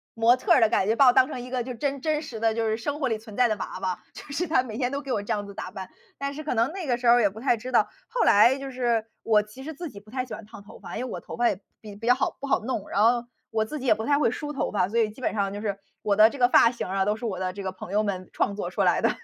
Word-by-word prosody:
模 230 Hz, +2 st, +5 dB
特 255 Hz, -, -2 dB
儿 -, -, +6 dB
的 225 Hz, -, +6 dB
感 195 Hz, -2 st, +1 dB
觉， 225 Hz, -, +2 dB
把 275 Hz, -, +6 dB
我 245 Hz, -, +7 dB
当 260 Hz, 0 st, +5 dB
成 250 Hz, -, -5 dB
一 250 Hz, -, -8 dB
个 250 Hz, -2 st, -1 dB
就 255 Hz, 0 st, -5 dB
真 275 Hz, +2 st, -2 dB
真 310 Hz, -1 st, 0 dB
实 230 Hz, -7 st, -7 dB
的 225 Hz, -1 st, +2 dB
就 225 Hz, 0 st, -1 dB
是 220 Hz, -, +1 dB
生 280 Hz, +6 st, -4 dB
活 275 Hz, -, +1 dB
里 225 Hz, -3 st, 0 dB
存 215 Hz, -1 st, -12 dB
在 250 Hz, -1 st, +5 dB
的 215 Hz, -, 0 dB
娃 185 Hz, -, -6 dB
娃， 185 Hz, -2 st, -2 dB
就 -, -, -10 dB
是 345 Hz, +5 st, -1 dB
她 300 Hz, -5 st, +3 dB
每 225 Hz, -3 st, -7 dB
天 250 Hz, -1 st, 0 dB
都 280 Hz, -, -2 dB
给 275 Hz, -3 st, -6 dB
我 205 Hz, -, 0 dB
这 205 Hz, -, -5 dB
样 205 Hz, -1 st, -3 dB
子 200 Hz, -, -10 dB
打 -, -, -6 dB
扮。 190 Hz, -1 st, -7 dB, 0.3 s
但 280 Hz, 0 st, -3 dB
是 310 Hz, +2 st, -7 dB
可 285 Hz, -, -2 dB
能 230 Hz, +6 st, +2 dB
那 365 Hz, -5 st, -6 dB
个 240 Hz, -2 st, +1 dB
时 245 Hz, -, -2 dB
候 235 Hz, -, +8 dB
儿 245 Hz, -, +4 dB
也 205 Hz, -, +4 dB
不 210 Hz, -, -11 dB
太 245 Hz, 0 st, +2 dB
知 250 Hz, +3 st, -7 dB
道， -, -, +4 dB, 0.2 s
后 -, -, 0 dB
来 235 Hz, +6 st, +6 dB
就 275 Hz, 0 st, -6 dB
是 240 Hz, -3 st, 0 dB, 0.2 s
我 210 Hz, -2 st, +4 dB
其 210 Hz, +6 st, -12 dB
实 315 Hz, +3 st, -6 dB
自 335 Hz, +2 st, -6 dB
己 200 Hz, -, -11 dB
不 210 Hz, +1 st, -20 dB
太 255 Hz, -1 st, -2 dB
喜 235 Hz, -, -9 dB
欢 215 Hz, -, -7 dB
烫 215 Hz, -1 st, -12 dB
头 220 Hz, +3 st, -14 dB
发， -, -, -7 dB
因 -, -, -3 dB
为 -, -, -6 dB
我 -, -, -4 dB
头 -, -, -9 dB
发 240 Hz, 0 st, +3 dB
也 190 Hz, -, -3 dB, 0.2 s
比 210 Hz, -2 st, -10 dB
比 230 Hz, +3 st, -7 dB
较 245 Hz, -, +6 dB
好 265 Hz, -, -1 dB
不 280 Hz, -, -5 dB
好 -, -, +2 dB
弄。 225 Hz, -3 st, -4 dB
然 205 Hz, -, +1 dB
后， 240 Hz, +1 st, +3 dB, 0.3 s
我 220 Hz, -1 st, +1 dB
自 300 Hz, +8 st, -6 dB
己 265 Hz, -, -6 dB
也 245 Hz, -, +6 dB
不 220 Hz, +1 st, -5 dB
太 285 Hz, 0 st, +3 dB
会 260 Hz, -6 st, +2 dB
梳 295 Hz, +3 st, -5 dB
头 280 Hz, -, -2 dB
发， 185 Hz, -3 st, +1 dB
所 235 Hz, -, 0 dB
以 220 Hz, -2 st, +2 dB
基 240 Hz, -, -14 dB
本 -, -, -1 dB
上 200 Hz, -2 st, -1 dB
就 205 Hz, -, -5 dB
是， 200 Hz, -2 st, -2 dB, 0.2 s
我 205 Hz, -1 st, +1 dB
的 215 Hz, +2 st, +7 dB
这 280 Hz, -, -9 dB
个 245 Hz, -2 st, +4 dB
发 230 Hz, -, +6 dB
型 240 Hz, -, -5 dB
儿 190 Hz, +1 st, -3 dB
啊， 195 Hz, -, +2 dB
都 210 Hz, -, +1 dB
是 220 Hz, -, -7 dB
我 190 Hz, -5 st, -3 dB
的 185 Hz, -1 st, -2 dB
这 200 Hz, 0 st, -7 dB
个 190 Hz, -, -2 dB
朋 185 Hz, 0 st, -10 dB
友 210 Hz, +1 st, +3 dB
们 185 Hz, -3 st, -3 dB
创 200 Hz, -, 0 dB
作 -, -, -3 dB
出 -, -, -2 dB
来 -, -, +3 dB
的。 -, -, +3 dB
230 Hz, 385 characters per minute, -26 LUFS, 210-260 Hz, 0.3 s, 候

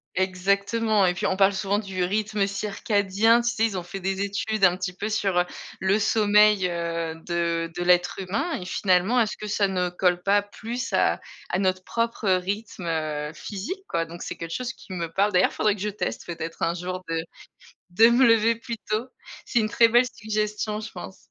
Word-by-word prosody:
Exactement 200 Hz, +3 st, +1 dB
et 180 Hz, -, +1 dB
puis -, -, -3 dB
on 190 Hz, -, +1 dB
parle 195 Hz, 0 st, +4 dB
souvent 200 Hz, +1 st, 0 dB
du 190 Hz, -3 st, -3 dB
rythme 210 Hz, +1 st, 0 dB
circadien, 205 Hz, +2 st, +1 dB
tu 240 Hz, -, 0 dB
sais? 225 Hz, -1 st, +1 dB
Ils 200 Hz, -4 st, -2 dB
ont -, -, -5 dB
fait 175 Hz, +3 st, -7 dB
des 195 Hz, +1 st, -2 dB
études 200 Hz, +1 st, -2 dB
un 180 Hz, -1 st, +5 dB
petit 180 Hz, -1 st, -3 dB
peu 210 Hz, +4 st, -4 dB
sur, 195 Hz, -4 st, +1 dB
heu, 180 Hz, -, +2 dB, 0.3 s
le 190 Hz, +2 st, +2 dB
sommeil, 210 Hz, -2 st, +4 dB
heu, 170 Hz, -1 st, -3 dB
de 170 Hz, -1 st, -1 dB
de 175 Hz, -, -3 dB
l'être 180 Hz, +1 st, +3 dB
humain 215 Hz, -, -2 dB
et -, -, -5 dB
finalement 185 Hz, +5 st, +2 dB
est-ce 220 Hz, -3 st, +1 dB
que 210 Hz, -, -6 dB
ça 205 Hz, -1 st, +1 dB
ne 180 Hz, -2 st, -1 dB
colle 180 Hz, 0 st, +1 dB
pas 200 Hz, +2 st, +3 dB
plus 225 Hz, +5 st, -6 dB
à -, -, +2 dB, 0.3 s
à 180 Hz, -, 0 dB
notre 185 Hz, -1 st, 0 dB
propre 230 Hz, -2 st, -1 dB
rythme, 190 Hz, +1 st, -1 dB
heu, 155 Hz, -2 st, -2 dB
physique 210 Hz, -, -6 dB
quoi, 165 Hz, -, 0 dB
donc 170 Hz, +1 st, -10 dB
c'est -, -, -5 dB
quelque 165 Hz, 0 st, -6 dB
chose 255 Hz, 0 st, -3 dB
qui 190 Hz, -, -11 dB
me 170 Hz, -2 st, -4 dB
parle. 200 Hz, +4 st, +2 dB
D'ailleurs 180 Hz, 0 st, +3 dB
faudrait 210 Hz, -1 st, +2 dB
que 195 Hz, -, -10 dB
je 210 Hz, -, -1 dB
teste 210 Hz, -, -4 dB
peut-être 165 Hz, -1 st, -6 dB
un 165 Hz, +1 st, +1 dB
jour 180 Hz, +1 st, -4 dB
de 165 Hz, 0 st, 0 dB, 0.7 s
de 225 Hz, +6 st, +6 dB
me 240 Hz, +2 st, +5 dB
lever 230 Hz, 0 st, +4 dB
plus 230 Hz, 0 st, -6 dB
tôt, 220 Hz, +4 st, -1 dB, 0.4 s
c'est 240 Hz, -, +1 dB
une 215 Hz, -, 0 dB
très 230 Hz, +1 st, +5 dB
belle 240 Hz, +2 st, +4 dB
suggestion 210 Hz, -2 st, -3 dB
je 220 Hz, -, -7 dB
pense. -, -, -9 dB
195 Hz, 205 wpm, -25 LUFS, 180-215 Hz, 0.7 s, de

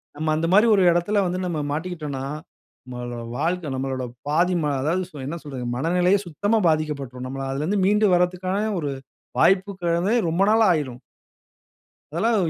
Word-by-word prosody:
நம்ம 155 Hz, +1 st, -2 dB
அந்த 160 Hz, +1 st, 0 dB
மாரி 210 Hz, +4 st, +6 dB
ஒரு 195 Hz, -, +3 dB
இடத்துல 185 Hz, +5 st, +1 dB
வந்து, 180 Hz, +1 st, -2 dB
நம்ம 165 Hz, -4 st, -2 dB
மாட்டிக்கிட்டோன்னா, 150 Hz, -4 st, -4 dB, 0.6 s
நம்மளோட 120 Hz, -1 st, -6 dB
வாழ்க்க 170 Hz, -3 st, -1 dB
நம்மளோட 130 Hz, 0 st, -3 dB, 0.2 s
பாதி 170 Hz, +5 st, +2 dB
ம -, -, -1 dB, 0.2 s
அதாவது 170 Hz, +6 st, 0 dB
சொ -, -, -17 dB
என்ன 170 Hz, +4 st, -4 dB
சொல்றது? 135 Hz, -4 st, -6 dB
மனநிலையே 180 Hz, +7 st, +2 dB
சுத்தமா 205 Hz, +8 st, 0 dB
பாதிக்கப்பட்டுரும். 140 Hz, -5 st, -2 dB
நம்ம 135 Hz, +1 st, -5 dB
அதிலேருந்து 155 Hz, +9 st, -1 dB
மீண்டு 210 Hz, +2 st, +3 dB
வரதுக்கான 180 Hz, +2 st, +1 dB, 0.2 s
ஒரு 145 Hz, -3 st, -2 dB, 0.5 s
வாய்ப்புங்கிறதே 185 Hz, 0 st, +2 dB
ரொம்ப 170 Hz, +4 st, 0 dB
நாளாயிரும். 160 Hz, -, +2 dB, 1.1 s
அதெல்லாம் 220 Hz, +7 st, +1 dB
170 Hz, 140 wpm, -23 LUFS, 145-185 Hz, 1.1 s, மாரி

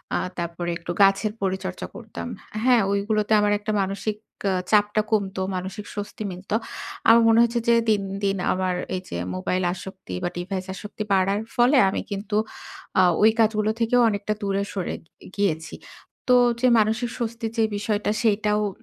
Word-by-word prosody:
আ -, -, +2 dB, 0.2 s
তারপরে 170 Hz, 0 st, -3 dB
একটু 170 Hz, 0 st, -6 dB
গাছের 195 Hz, +2 st, +4 dB
পরিচর্চা 190 Hz, -1 st, -3 dB
করতাম। 230 Hz, +1 st, -7 dB, 0.4 s
হ্যাঁ? 250 Hz, -2 st, +5 dB
ওইগুলোতে 210 Hz, +1 st, 0 dB
আমার 210 Hz, 0 st, +2 dB
একটা 210 Hz, +1 st, -3 dB
মানসিক 200 Hz, +2 st, -2 dB, 0.3 s
আ -, -, +1 dB, 0.2 s
চাপটা 210 Hz, 0 st, +4 dB
কমতো, 195 Hz, -3 st, 0 dB
মানসিক 190 Hz, +3 st, -5 dB
স্বস্তি 205 Hz, +1 st, -5 dB
মিলত। 185 Hz, +3 st, -10 dB, 0.6 s
আমার 230 Hz, +1 st, +8 dB
মনে 225 Hz, 0 st, +5 dB
হয়েছে 235 Hz, 0 st, +2 dB
যে 235 Hz, -, +6 dB
দিন, 210 Hz, -2 st, +2 dB, 0.2 s
দিন 195 Hz, 0 st, +1 dB, 0.2 s
আমার 185 Hz, -1 st, -1 dB, 0.2 s
এইযে 185 Hz, -, -6 dB, 0.2 s
মোবাইল 180 Hz, -, -1 dB
আসক্তি 190 Hz, -, -9 dB
বা, -, -, 0 dB
ডিভাইস 185 Hz, +1 st, -4 dB
আসক্তি 210 Hz, +2 st, -6 dB
বাড়ার 195 Hz, +1 st, +3 dB, 0.2 s
ফলে 245 Hz, +4 st, +4 dB
আমি -, -, -2 dB
কিন্তু 205 Hz, +1 st, -3 dB, 0.6 s
আ -, -, +8 dB, 0.2 s
ওই 220 Hz, +1 st, +7 dB
কাজগুলো 215 Hz, -1 st, +3 dB
থেকেও 240 Hz, +2 st, +3 dB
অনেকটা 205 Hz, 0 st, -2 dB
দূরে 200 Hz, -1 st, 0 dB
সরে 190 Hz, -3 st, -3 dB
গি 165 Hz, -, -18 dB
গিয়েছি। 165 Hz, -5 st, -1 dB, 0.6 s
তো -, -, +7 dB, 0.2 s
যে 255 Hz, -, +5 dB
মানসিক 220 Hz, +3 st, +1 dB
স্বস্তির 230 Hz, -1 st, -3 dB
যে 225 Hz, -, +4 dB
বিষয়টা, 205 Hz, 0 st, -1 dB
সেইটাও 210 Hz, -1 st, +2 dB
উ -, -, 0 dB
205 Hz, 165 wpm, -24 LUFS, 190-220 Hz, 0.6 s, আমার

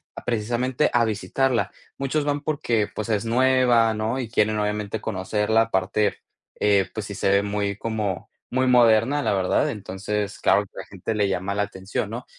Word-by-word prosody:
a -, -, -8 dB
precisamente 120 Hz, +4 st, 0 dB
a 120 Hz, -1 st, +4 dB
visitarla. 120 Hz, +4 st, 0 dB, 0.3 s
Muchos 140 Hz, +2 st, -1 dB
van 145 Hz, 0 st, -1 dB
porque, 120 Hz, -9 st, 0 dB
pues, 110 Hz, +1 st, -4 dB
es 105 Hz, 0 st, 0 dB
nueva, 120 Hz, -2 st, +3 dB
¿no?, 110 Hz, +4 st, -1 dB
y 120 Hz, -4 st, -4 dB
quieren 110 Hz, -1 st, +1 dB
obviamente 105 Hz, 0 st, -2 dB
conocerla, 105 Hz, +2 st, +1 dB
aparte, 100 Hz, 0 st, 0 dB, 0.4 s
eh, 100 Hz, -2 st, +3 dB
pues, -, -, -5 dB
sí -, -, -6 dB
se 100 Hz, -, 0 dB
ve 100 Hz, 0 st, +4 dB
muy 100 Hz, 0 st, -2 dB
como, 105 Hz, -6 st, -3 dB, 0.2 s
muy 130 Hz, +1 st, +1 dB
moderna, 120 Hz, +3 st, +4 dB
la -, -, +1 dB
verdad. 95 Hz, -1 st, +1 dB
Entonces, 105 Hz, 0 st, -4 dB
claro 100 Hz, +1 st, +3 dB
que -, -, -24 dB
a -, -, -4 dB
la -, -, -7 dB
gente 100 Hz, +3 st, -4 dB
le 105 Hz, -2 st, +1 dB
llama 95 Hz, +1 st, -2 dB
la 105 Hz, -, +1 dB
atención, 100 Hz, +1 st, -4 dB
¿no?, 120 Hz, +3 st, -6 dB
110 Hz, 185 wpm, -24 LUFS, 100-120 Hz, 0.4 s, a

